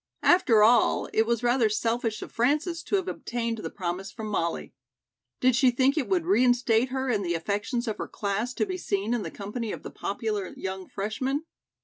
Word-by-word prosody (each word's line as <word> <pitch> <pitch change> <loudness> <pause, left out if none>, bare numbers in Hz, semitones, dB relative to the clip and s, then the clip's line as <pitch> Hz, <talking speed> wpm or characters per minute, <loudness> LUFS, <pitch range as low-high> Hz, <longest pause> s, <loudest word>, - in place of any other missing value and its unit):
After 240 - +5
all, 235 +3 +4
it 220 0 +3
was 235 0 0
rather 240 -2 +3
selfish 225 +1 -1
of - - -10
Frances 305 +8 +1
to - - -1
have 380 -2 0
obtained 235 -7 -3
the - - -4
promise 185 +1 -4
from 220 -1 -6
Molly. 170 -5 -2 0.7
Did 255 -1 +4
she 260 0 +5
think 260 +3 +2
it 305 -5 -1
would 360 -3 +1
reinstate 245 - +3
her 265 +1 -2
in 210 -3 +1
the 170 -3 -1
affections 205 +8 -2
of 220 - -3
her - - -3
class 215 +5 -2
to - - +1
be 370 -2 -4
seen 205 - -1
in 240 - 0
the - - -4
company 210 +2 -5
of - - -7
the - - -7
popular 205 -2 -3
young 190 -1 -5
freshman? 260 +9 -2
230 Hz, 200 wpm, -27 LUFS, 210-255 Hz, 0.7 s, After